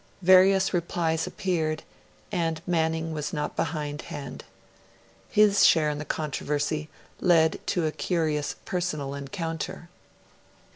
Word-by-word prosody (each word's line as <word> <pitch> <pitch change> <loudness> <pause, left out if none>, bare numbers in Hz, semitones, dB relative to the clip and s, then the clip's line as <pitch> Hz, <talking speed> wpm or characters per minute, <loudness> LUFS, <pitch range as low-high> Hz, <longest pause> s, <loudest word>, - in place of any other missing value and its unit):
Various 190 +2 +6
replies 165 -1 0
appeared, 170 -5 -1 0.5
and 165 -2 -1
Manning 160 -2 0
was 150 -1 -3
not 150 -1 -3
behindhand. 145 -3 -4 0.9
His 205 -1 +5
share 155 -2 +5
in 145 - -4
the 150 - -5
controversy 150 0 -2 0.3
led 165 -3 +4
to 175 -3 +1
a 155 - 0
curious 155 -1 -1
personal 175 -8 -2
encounter. 165 +4 -5
160 Hz, 105 wpm, -27 LUFS, 150-175 Hz, 0.9 s, Various